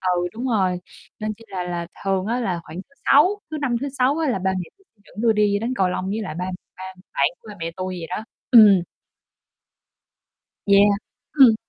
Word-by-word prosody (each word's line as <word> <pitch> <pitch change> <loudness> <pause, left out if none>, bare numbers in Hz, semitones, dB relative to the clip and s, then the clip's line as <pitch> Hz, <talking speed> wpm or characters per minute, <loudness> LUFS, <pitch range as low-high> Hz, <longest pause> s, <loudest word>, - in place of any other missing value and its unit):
Ừ, 175 0 0
đúng 245 +4 -4
rồi, 190 -6 +1 0.4
nên 215 0 -2
chi 225 +2 -17
là 185 -2 -4
là 175 -1 -4 0.2
thường 195 -1 0
á 235 +4 -1
là 185 -8 -1
khoảng 160 +1 -10
thứ 280 - -31
Sáu, 360 +9 +5
thứ 310 - -3
Năm, 255 -4 0
thứ 280 - -2
Sáu 270 +2 +1
á 320 -3 0
là 235 - 0
ba 190 +1 0
mẹ 180 - -4
tui 390 - -29 0.2
dẫn - - -20
tui 230 -2 +4
đi 205 -1 +2
đánh 235 +3 -2
cầu 190 -5 +2
lông 180 0 -3
với 220 +2 -2
lại 185 -7 -5
ba 180 +2 -3 0.3
ba 185 - -8 0.3
bạn - - +3
của - - -17
ba 210 - -9
mẹ 165 0 -3
tui 185 -1 -4
vậy 165 - -6
đó. 185 +4 -4 0.3
Ừm. 210 -6 +8 1.9
Yeah. 200 0 +5 0.4
Ừm. 240 -4 +9
205 Hz, 215 wpm, -22 LUFS, 185-240 Hz, 1.9 s, Ừm